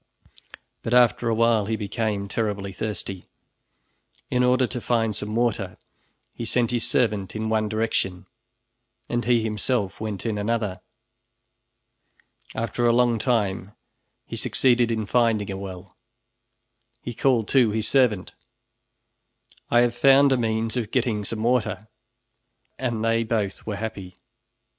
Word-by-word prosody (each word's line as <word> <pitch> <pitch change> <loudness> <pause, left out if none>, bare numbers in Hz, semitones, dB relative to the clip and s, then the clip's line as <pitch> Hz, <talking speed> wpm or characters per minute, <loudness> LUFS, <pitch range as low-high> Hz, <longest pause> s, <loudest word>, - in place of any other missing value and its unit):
But 115 - 0
after 120 -1 +4
a 115 - +1
while 115 -2 +3
he 110 - 0
became 105 -1 -2
terribly 100 -2 -2
thirsty. 95 -2 -5 1.1
In 125 0 +2
order 125 +1 +3
to 125 0 -5
find 115 -3 0
some 105 +1 -4
water 110 -6 0 0.6
he - - -6
sent 115 +1 0
his 120 -2 -1
servant 105 -6 0
in 110 0 -2
one 110 -1 +1
direction 110 -4 -1 0.8
and 120 0 -1
he 120 -2 +3
himself 105 -1 -1
went 110 -2 -4
in 110 -2 -1
another. 105 -3 -1 1.7
After 115 +2 0
a - - +5
long 120 -2 +3
time 105 -5 0 0.5
he - - -7
succeeded 120 -2 +2
in 110 -2 -1
finding 110 -3 +1
a 95 - -4
well. 95 -2 -9 1.1
He 120 - -5
called 120 -3 +2
to 130 -5 +4
his 110 +1 -1
servant, 120 -9 +2 1.4
"I 120 - +5
have 120 -1 +2
found 135 +3 +5
a - - +5
means 110 -1 -1
of 115 -4 -2
getting 115 -4 0
some 110 +2 -4
water," 115 -3 0 0.9
and 120 -4 -1
they 115 0 +2
both 110 -4 -2
were 105 - -2
happy. 100 -4 -6
110 Hz, 135 wpm, -24 LUFS, 105-120 Hz, 1.7 s, a